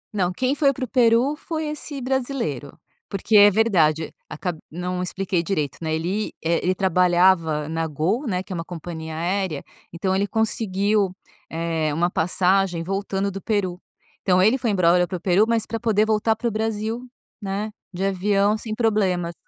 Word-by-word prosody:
Não, 185 -3 +1
quem 255 +8 0
foi 285 -1 +3
para 260 -1 -4
o - - -12
Peru 245 +3 +3
foi 315 0 -4
esse 300 -1 -5
brasileiro, 245 - -3 0.3
porque 200 +2 -1
é 205 0 +9
verdade, 170 -8 +2 0.2
acab 170 0 -4
não 180 +2 -3
expliquei 185 0 -1
direito, 160 -5 -2
né, 160 -1 -1
ele 185 +7 -2
é 170 +1 +1
ele 185 +1 +1
trabalhava 175 -4 +3
na 165 +1 -2
Gol, 180 - -1
né, 185 -3 -1
que 190 - -8
é - - -3
uma 165 - -3
companhia 160 -2 -7
aérea, 175 -2 -1 0.3
então, 185 +3 -1
ele 200 +1 +1
conseguiu, 210 -2 +1 0.4
eh, 165 -1 -1
uma 175 +2 +1
passagem 180 0 +1
voltando 195 +1 -2
do 195 +1 -7
Peru. 190 -5 -1 0.4
Então, 185 -1 +3
ele 215 +6 +5
foi 240 - 0
embora 180 -2 +3
para 180 - -4
o - - -11
Peru, 185 +4 +3
mas 230 -1 +1
pra 225 - -4
poder 215 -2 +2
voltar 220 +1 +2
para 235 +2 -3
o - - 0
Brasil, 220 +1 -2 0.4
né, 205 +2 -3 0.2
de 185 0 -4
avião, 200 +2 +2
sem 220 0 -5
problema. 195 -7 +1
195 Hz, 175 wpm, -23 LUFS, 175-220 Hz, 0.4 s, é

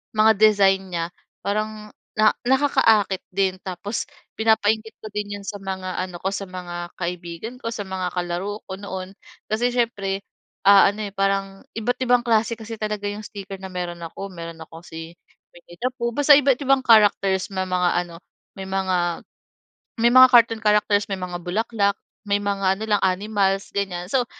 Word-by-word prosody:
mga 215 +1 +6
design 195 -3 +4
niya 165 -1 -1 0.4
parang 215 +1 -3 0.3
na 215 0 +5
nakaka-akit 250 -8 +3
din. 190 0 +1
Tapos 195 +4 -4 0.3
pinapa-inggit 220 0 +1
ko 215 - -7
din 205 -1 -3
'yon 200 - -12
sa 205 - -4
mga 185 -1 -4
ano 180 -2 -7
ko 190 - -2
sa, 200 - -3
mga 175 -1 -6
kaibigan 175 +6 -5
ko, 230 - -3
sa 205 - -4
mga 185 -2 -3
kalaro 180 +4 -3
ko 190 - -6
noon. 190 -1 -6 0.4
Kasi 235 +3 +1
siyempre, 200 -5 -1 0.5
ah, 200 -1 +8
ano, 210 0 -5
eh, - - -21
parang 195 0 -1
iba't 245 +3 -1
ibang 245 -1 +3
klase 230 0 +2
kasi 225 +1 -7
talaga 210 -1 -3
'yong 210 +1 -6
sticker 195 -3 -8
na 190 - -7
meron 175 -1 -5
ako. 195 +4 -6
Meron 165 -1 -8
ako 165 +1 -13
si 165 +1 -9 0.4
"Winnie 175 0 -15
the 250 - +1
Pooh," 235 -1 -2
basta 290 0 +6
iba't 275 -2 +3
ibang 270 -1 +3
characters 200 -4 +4
may 190 0 -1
mga 180 -1 +1 0.2
ano 170 -1 -12 0.4
may 190 - -6
mga 185 -3 -1 0.8
may 240 - +6
mga 255 0 +10
cartoon 230 -2 +5
characters, 210 -1 +3
may 190 - -2
mga 180 -1 -4
bulaklak, 200 +1 0 0.3
may 200 0 +3
mga 195 -1 +1
ano 220 - -6
lang 205 -1 +2
animals 195 +1 0
ganyan. 180 -3 -2
So, 250 -2 +2
200 Hz, 170 wpm, -23 LUFS, 185-220 Hz, 0.8 s, mga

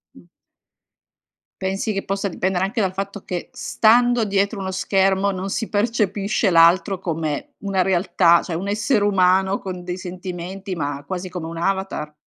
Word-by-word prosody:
Mh. 90 - -17 1.4
Pensi 195 +3 -1
che 195 - -3
possa 195 +1 -2
dipendere 185 +1 0
anche 220 +4 -2
dal 190 -2 0
fatto 195 +1 -5
che 180 -1 -5
stando 240 +1 +3
dietro 200 +1 0
uno 190 -1 -3
schermo 195 +1 +1
non 190 +1 -4
si 225 +3 -3
percepisce 210 -2 0
l'altro 170 +2 +4
come 160 -5 -3
una 195 -2 0
realtà, 175 -2 +3
cioè 170 - -5
un 185 +4 -3
essere 210 +2 +1
umano 190 -1 +3
con 185 -2 -6
dei 180 0 -4
sentimenti 185 +1 -6
ma 145 -3 -3
quasi 185 +3 -5
come 180 -2 -6
un 165 0 -7
avatar? 190 -4 -2
190 Hz, 155 wpm, -21 LUFS, 180-200 Hz, 1.4 s, l'altro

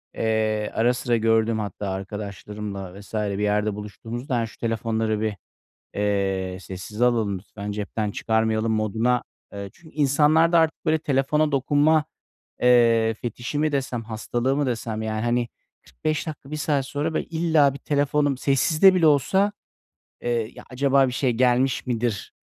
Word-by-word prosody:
eee, 110 -1 0
ara 120 +2 +3
sıra 120 -1 0
gördüğüm 115 0 +2
hatta 100 -1 -4
arkadaşlarımla 100 0 -6
vs. 100 - -17
bir 105 -2 -1
yerde 105 0 +1
buluştuğumuzda, 115 +6 -5
hani, 115 - 0
şu - - -16
telefonları 110 -1 -1
bir, 110 -2 -1 0.6
eee, 95 -2 -1
sessize 95 +6 -3
alalım 110 -6 +1
lütfen, 100 +2 -8
cepten 105 +1 -3
çıkarmayalım 110 +1 0
moduna 110 +3 +1 0.3
Eee, 100 -1 -6
çünkü 160 -2 -19
insanlarda 155 +4 +4
artık, 160 +1 +1
böyle, 160 0 +2
telefona 150 +1 +1
dokunma, 145 +3 +3 0.6
eee, 115 -2 +4
fetişi 120 +5 -5
mi 155 0 +1
desem, 130 -4 -2
hastalığı 120 +4 -1
mı 145 -2 +1
desem, 115 -2 -3
ya, 110 +1 -2
hani, 120 0 +1 0.3
45 155 +1 -3
dakika, 145 -3 -8
1 155 - -3
saat 145 -3 0
sonra, 145 +3 -2
böyle, - - -1
illa 160 -4 +2
bir - - -7
telefonum 145 0 +1
sessizde 155 +8 +4
bile 170 -3 +3
olsa, 190 +8 +3 0.7
eee, 120 -2 -1
"Ya, - - -12
acaba 135 +1 +3
bir - - -4
şey 130 -1 +1
gelmiş 125 +3 +2
midir? 115 -4 -2
120 Hz, 150 wpm, -24 LUFS, 110-140 Hz, 0.7 s, insanlarda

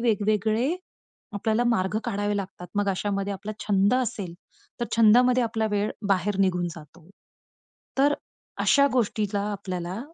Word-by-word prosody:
वेगवेगळे 220 - +1 0.6
आपल्याला 220 +3 +1
मार्ग 215 -3 +1
काढावे 205 -2 -1
लागतात. 190 -2 -6
मग 205 -1 +1
अशामध्ये 200 +1 -2
आपला 210 +2 -6
छंद 200 +2 +3
असेल 205 -8 -2 0.5
तर 240 - 0
छंदामध्ये 245 +3 +5
आपला 225 -1 0
वेळ 205 +1 0 0.2
बाहेर 195 +1 +1
निघून 180 -2 +2
जातो. 160 +2 -14 0.9
तर 285 +1 +4 0.5
अशा 280 -1 +5
गोष्टीला 210 -4 0
आपल्याला, 185 -1 -4
205 Hz, 125 wpm, -26 LUFS, 195-230 Hz, 0.9 s, छंदामध्ये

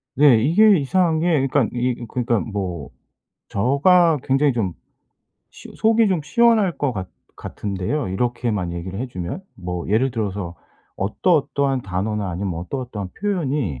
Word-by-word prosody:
네 140 -4 +6
이게 205 +6 +5
이상한 160 +2 +1
게 165 - -1 0.2
그러니까 135 -3 +2
이 125 +1 +1
이 120 - -6
그러니까 120 -1 0
뭐 95 -8 -4 0.6
저가 155 - +3
굉장히 135 0 +2
좀 100 -7 -1 0.8
시 - - -13
속이 225 0 +3
좀 185 -4 +1
시원할 215 +2 +3
것 145 -3 0
같 95 -4 -5 0.3
같은데요 100 +8 -3
이렇게만 105 -3 -1
얘기를 90 +4 -5
해 130 - -2
주면. 90 - -5
뭐 90 -2 -5
예를 115 +6 +2
들어서 100 -6 -3 0.4
"어떠어떠한 140 - +1
단어나 100 +2 -2
아니면 90 +1 -3
어떠어떠한 105 -1 -5
표현이 145 - -1
120 Hz, 315 characters per minute, -21 LUFS, 95-150 Hz, 0.8 s, 네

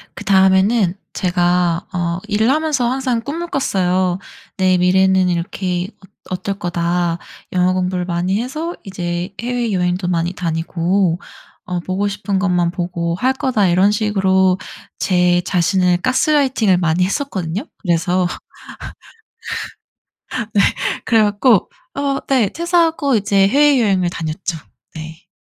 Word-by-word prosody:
그다음에는 190 0 +3 0.2
제가 175 -1 +1
어 170 -1 -1
일을 220 +3 +1
하면서 295 -4 +1
항상 255 -2 -1
꿈을 325 +8 -4
꿨어요. 185 - 0 0.4
'내 185 -1 +3
미래는 190 +1 +3
이렇게 180 +1 -2 0.2
어 - - -26 0.2
어떨 190 +2 -3
거다. 175 0 -1 0.4
영어 180 0 +2
공부를 180 -1 -1
많이 180 +4 -1
해서 310 +8 -4
이제 175 -1 -4
해외여행도 200 -7 -1
많이 170 0 0
다니고 170 +1 0 0.5
어 180 -1 -3
보고 185 +3 -1
싶은 200 -1 -2
것만 180 -3 +1
보고 170 -1 -2
할 255 +8 +1
거다.' 245 -7 +1
이런 185 +4 +4
식으로 190 -3 +2 0.4
제 180 -1 +2
자신을 180 0 +2
가스라이팅을 255 -4 +2
많이 170 0 +1
했었거든요. 195 - -3 0.2
그래서 180 0 +1 2.3
네 205 - +4 0.4
그래 225 -2 +4
갖고 205 - +3 0.2
어 280 -1 -1
네 250 -7 +3
퇴사하고 330 -5 +1
이제 200 -1 +3
해외여행을 230 -10 +3
다녔죠. 165 +1 -4 0.4
네. 160 +1 -9
190 Hz, 265 characters per minute, -18 LUFS, 175-220 Hz, 2.3 s, 이런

